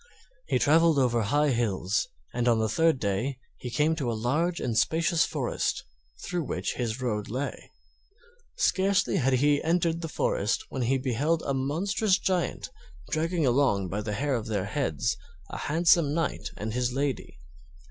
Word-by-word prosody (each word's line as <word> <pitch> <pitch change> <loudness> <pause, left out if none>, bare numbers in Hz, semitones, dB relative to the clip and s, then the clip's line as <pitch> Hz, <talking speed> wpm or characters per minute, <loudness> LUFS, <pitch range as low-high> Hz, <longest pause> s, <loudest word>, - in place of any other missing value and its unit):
He - - +2
traveled 160 +1 +4
over 120 -3 +2
high 145 +7 +2
hills, 105 -5 0 0.3
and 120 0 0
on 115 -1 +4
the 110 0 +1
third 160 +6 +2
day 110 +6 -1 0.2
he 125 - -5
came 150 +6 +1
to 130 -6 -1
a 115 - -3
large 155 +10 0
and 120 -3 -2
spacious 165 +6 +2
forest - - -2 0.4
through 175 -1 -2
which - - -2
his 120 -1 -3
road 105 -4 -2
lay. 130 +6 -4 0.9
Scarcely 195 0 +2
had 135 -1 +2
he 145 +3 +3
entered 165 0 +1
the 165 - -3
forest 120 - 0
when 130 - -4
he 130 +3 +2
beheld 140 +6 0
a 140 - 0
monstrous 185 +10 +1
Giant 185 -2 -1 0.4
dragging 165 0 0
along 120 -8 +2
by 100 +4 -2
the 105 0 -4
hair 140 +5 -1
of 115 -3 -2
their 105 -3 -1
heads 100 - -1 0.3
a - - -5
handsome 160 -1 +3
Knight 165 -4 -2
and 110 +1 -4
his 125 0 0
lady. 135 - -3
135 Hz, 165 wpm, -27 LUFS, 115-160 Hz, 0.9 s, traveled